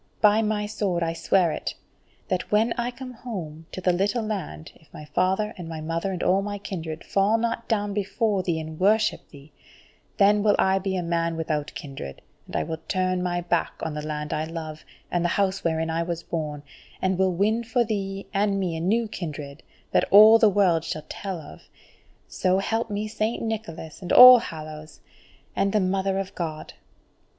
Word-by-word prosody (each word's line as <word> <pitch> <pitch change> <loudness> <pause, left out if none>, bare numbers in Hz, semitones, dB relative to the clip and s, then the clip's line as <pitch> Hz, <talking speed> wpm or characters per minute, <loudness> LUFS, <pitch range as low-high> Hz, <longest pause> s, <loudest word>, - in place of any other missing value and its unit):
By 210 +1 +5
my 210 -1 0
sword 200 -5 -1
I 165 0 -1
swear 170 +1 +2
it, - - -4 0.5
that 185 - -2
when 220 +3 +3
I 240 0 -2
come 250 +1 -9
home 165 -10 -7
to - - -6
the 180 -1 +2
little 200 +6 0
land, 185 - -5
if 160 - -24
my 150 - -10
father 190 +7 0
and 170 -2 -7
my 160 -1 -5
mother 165 +4 -2
and 185 - -3
all 190 +2 +3
my 205 0 -4
kindred 165 -5 -6
fall 200 +3 +2
not 230 0 -2
down 205 -2 0
before 205 0 0
thee 170 -3 -1
and 155 0 -7
worship 215 +3 +2
thee, 145 +1 -15 0.7
then 205 0 +5
will 205 0 +4
I 190 0 +3
be 190 0 -2
a 180 - -1
man 170 0 -1
without 155 -2 -3
kindred, 135 - -8 0.2
and - - -9
I - - +1
will 160 0 -5
turn 185 -1 0
my 175 -1 -1
back 175 -1 0
on 160 - -3
the 150 - -4
land 150 0 -4
I 155 +1 -1
love, 160 -1 -7 0.3
and 175 -1 0
the 175 - +1
House 195 -1 0
wherein 160 -1 0
I 165 +1 0
was 170 0 -3
born, 150 -3 -4 0.4
and 185 -1 0
will 190 -2 +2
win 215 +5 +1
for 240 +1 +1
thee 195 -3 -3
and 200 0 +1
me 180 -4 -1
a - - -3
new 220 +7 +1
kindred 150 -7 -7 0.3
that - - +2
all 215 +3 +9
the 220 - +6
world 185 -5 +3
shall 155 -2 -5
tell 190 -3 -5
of. 115 - -13 0.6
So 185 0 +1
help 225 +4 -1
me 210 +1 -2
Saint 215 +2 -2
Nicholas, 210 -9 -5
and 180 - -5
all 250 0 +11
Hallows, 155 -4 -9 0.5
and 195 - +1
the 215 - +2
Mother 190 0 0
of 195 -1 -4
God!" 160 -3 -5
185 Hz, 195 wpm, -25 LUFS, 165-210 Hz, 0.7 s, all